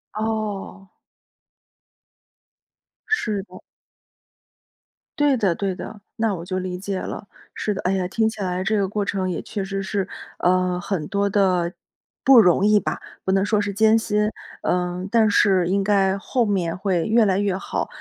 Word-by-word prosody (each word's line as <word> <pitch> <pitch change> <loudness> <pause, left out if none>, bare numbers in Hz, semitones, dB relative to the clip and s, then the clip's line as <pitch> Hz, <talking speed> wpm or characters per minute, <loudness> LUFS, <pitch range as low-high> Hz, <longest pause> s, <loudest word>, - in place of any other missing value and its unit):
哦。 215 -3 -3 2.2
是 215 - 0
的。 - - -14 1.6
对 285 -3 +4
的， 195 -6 +1
对 195 -2 -2
的， 210 +3 -8 0.2
那 220 -3 +1
我 170 - -7
就 185 0 -2
理 180 -1 -4
解 195 0 -3
了。 - - -6 0.3
是 210 - -2
的， 195 - -5
哎 185 - +1
呀， 185 -2 0
听 220 +4 +1
起 220 -2 -8
来 180 -1 -1
这 215 +2 +1
个 195 -2 0
过 205 0 -1
程 190 -2 -1
也 165 - -3
确 200 - -4
实 195 0 -3
是， 195 -1 -2 0.3
呃， 180 0 +2
很 175 -6 -3
多 200 0 0
的 185 -4 +2 0.5
不 265 -2 +8
容 190 -2 +5
易 210 0 +5
吧， - - -3 0.2
不 190 - 0
能 195 +1 +2
说 210 -1 +2
是 205 0 -2
艰 220 +2 +4
辛， 210 -1 +1 0.3
呃， 180 +1 -1
但 225 -1 +4
是 185 -4 +3
应 195 +1 +2
该 195 -1 +2
后 240 +4 0
面 180 -5 -1
会 185 -3 0
越 225 +1 +4
来 195 -2 +2
越 200 -2 0
好， - - -3
195 Hz, 180 characters per minute, -22 LUFS, 185-210 Hz, 2.2 s, 不